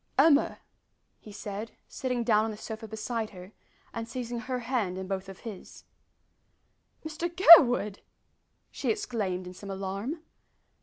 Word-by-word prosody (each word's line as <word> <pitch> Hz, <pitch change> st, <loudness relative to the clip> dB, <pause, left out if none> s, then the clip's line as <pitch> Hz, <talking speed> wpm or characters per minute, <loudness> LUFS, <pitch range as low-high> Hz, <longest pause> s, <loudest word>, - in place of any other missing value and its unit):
"Emma!" 285 Hz, +1 st, +4 dB, 0.6 s
he 210 Hz, -, -13 dB
said, 205 Hz, +2 st, -7 dB
sitting 250 Hz, -2 st, -3 dB
down 215 Hz, -2 st, +3 dB
on 225 Hz, -, -2 dB
the 215 Hz, -, -7 dB
sofa 220 Hz, +1 st, -7 dB
beside 220 Hz, +1 st, -4 dB
her, 185 Hz, 0 st, -12 dB, 0.4 s
and 230 Hz, 0 st, -5 dB
seizing 240 Hz, -1 st, -4 dB
her 250 Hz, +1 st, -4 dB
hand 230 Hz, -7 st, -2 dB
in 190 Hz, 0 st, -5 dB
both 195 Hz, 0 st, -4 dB
of 190 Hz, -, -11 dB
his. 215 Hz, -6 st, -10 dB, 1.2 s
"Mr 315 Hz, +2 st, -3 dB
Gurwood!" 275 Hz, -, +7 dB, 0.7 s
she -, -, -3 dB
exclaimed 215 Hz, -, -2 dB
in 180 Hz, -, -8 dB
some 200 Hz, +2 st, -10 dB
alarm. 195 Hz, -, -4 dB
220 Hz, 140 wpm, -28 LUFS, 195-255 Hz, 1.2 s, Gurwood